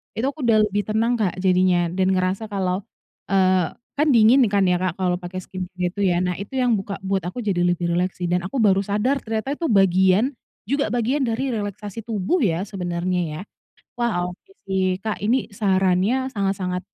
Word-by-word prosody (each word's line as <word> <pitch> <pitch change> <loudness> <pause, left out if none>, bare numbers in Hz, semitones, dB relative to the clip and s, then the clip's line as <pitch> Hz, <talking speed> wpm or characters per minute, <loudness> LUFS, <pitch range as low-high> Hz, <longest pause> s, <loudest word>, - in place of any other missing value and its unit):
itu 225 - -3
aku 285 -2 -5
sudah 225 -2 +4
lebih 205 0 0
tenang, 225 +3 +1
Kak, 195 -5 +1
jadinya 180 -2 +3
dan 185 +1 +1
merasa 185 +3 0
kalau, 190 -2 -2 0.5
eee 185 -3 +3 0.2
kan 300 0 +2
dingin 235 +3 +6
kan 200 -1 +3
ya, 180 - +3
Kak, 185 0 -2
kalau 180 -1 +1
pakai 180 +1 -6
skincare 185 0 -7
gitu 180 +3 -1
ya. 175 -2 +2
Nah, 180 -1 -1
itu 200 +6 -8
yang 245 -2 +3
buka 200 0 -4
buat 190 -1 -2
aku 180 +7 -5
lebih 175 -4 0
rileks 180 +2 -1
sih. 175 - -1
Dan 175 0 0
aku 195 +9 -3
baru 195 -3 +3
sadar 210 +8 0
ternyata 225 +5 -2
itu 335 - -4
bagian 195 +5 +3 0.3
juga 280 +2 0
bagian 245 +4 0
dari 250 +2 -1
relaksasi 205 0 -5
tubuh 220 - -1
ya 180 -2 0
sebenarnya 180 -1 -2 0.2
ya. - - -6 0.6
Wah, 180 -7 0
oke 185 - -15
sih. 190 -1 0
Kak, 215 -1 -2
ini 235 +6 0
sarannya 195 +5 +1
sangat-sangat, 195 -4 -1
195 Hz, 185 wpm, -22 LUFS, 180-225 Hz, 0.6 s, dingin